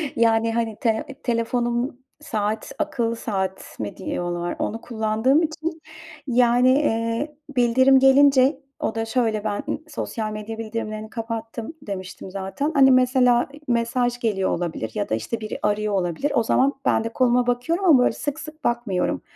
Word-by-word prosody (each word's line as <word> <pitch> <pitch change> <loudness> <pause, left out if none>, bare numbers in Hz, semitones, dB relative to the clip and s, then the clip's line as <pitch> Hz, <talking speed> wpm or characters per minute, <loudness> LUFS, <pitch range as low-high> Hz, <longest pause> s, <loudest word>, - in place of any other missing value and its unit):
Yani 225 0 +3
hani 230 -2 -1
tele 225 -4 +1 0.2
telefonum 240 +1 -1 0.2
saat, 215 -4 -2
akıllı 240 -7 -1
saat 190 -4 -4
mi 105 -2 -5
diyorlar 175 0 -3
onu 225 +2 -2
kullandığım 225 +6 +1
için 320 +1 -4 0.5
yani, 245 0 +4
eee, 245 +1 0 0.2
bildirim 260 +2 +5
gelince 270 0 +5 0.2
o 220 - -2
da 225 0 -1
şöyle, 225 -2 +1
ımm, 210 - -6
ben 205 +6 -2
sosyal 225 -7 -4
medya 215 +1 -6
bildirimlerini 215 -1 -5
kapattım 230 +3 -5
demiştim 190 -4 -7
zaten 195 +10 -3
hani 265 -1 +7
mesela 250 -1 +4
i 295 - -12
mesaj 240 +1 0
geliyor 205 -5 0
olabilir 160 -10 -3
ya - - -2
da, 110 - +1
işte, 115 - -4
biri 215 - -5
arıyor 210 0 0
olabilir 185 - -1
o 235 - +3
zaman 265 +5 +2
ben 225 - +2
de 230 - -3
koluma 245 -1 +2
bakıyorum 285 +10 0
ama 310 -8 +7
böyle 250 - +4
sık 290 0 -4
sık 310 0 -10
bakmıyorum 235 -6 0
230 Hz, 155 wpm, -23 LUFS, 215-260 Hz, 0.5 s, hani